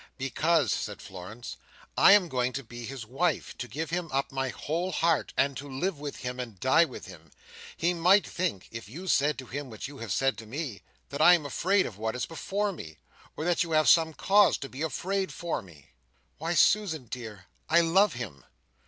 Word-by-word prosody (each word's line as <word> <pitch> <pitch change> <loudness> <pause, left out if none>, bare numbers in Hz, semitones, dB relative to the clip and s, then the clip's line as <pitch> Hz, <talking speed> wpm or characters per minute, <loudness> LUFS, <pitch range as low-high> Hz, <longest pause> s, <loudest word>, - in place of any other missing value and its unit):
"Because," 135 - +1
said 105 -1 -4
Florence, 100 +5 -9 0.4
"I 195 - +8
am 200 -4 +5
going 125 -3 -1
to 140 - -4
be 120 0 -9
his 130 -2 -7
wife, 145 +7 -1
to 125 - -4
give 160 +5 -5
him 175 -1 -2
up 135 +1 -1
my 135 0 -2
whole 170 +8 -3
heart, 165 -1 +1
and 140 0 +2
to 145 +1 -7
live 145 +5 -2
with 145 -1 -5
him 125 0 -4
and 115 -6 -6
die 130 - +5
with - - -9
him. - - -13 0.5
He 175 +1 +1
might 180 +4 +4
think, 170 - -3
if 115 -2 -8
you 170 +11 -8
said 150 -4 +2
to 130 - -7
him 140 +2 -6
what 110 +1 -6
you 140 0 -11
have 115 -4 -6
said 135 +8 +1
to 110 - -10
me, 130 - -5 0.3
that 140 +2 -4
I 175 +3 +9
am 160 -4 -3
afraid 190 +7 +2
of 105 -3 -8
what 110 +1 -2
is 125 - -2
before 200 +5 -2
me, 80 - -9 0.4
or 155 - -3
that 175 -1 +2
you 165 -2 -1
have 155 0 +4
some 160 -2 +5
cause 205 0 +4
to 135 - -7
be 130 - -8
afraid 190 +4 -1
for 170 -1 -3
me. 80 -7 -17 0.5
Why, 165 +3 -1
Susan, 170 -11 +3
dear, 110 -5 -8 0.2
I 170 +1 +6
love 190 +5 +4
him!" 100 - -7
145 Hz, 210 wpm, -28 LUFS, 120-170 Hz, 0.5 s, I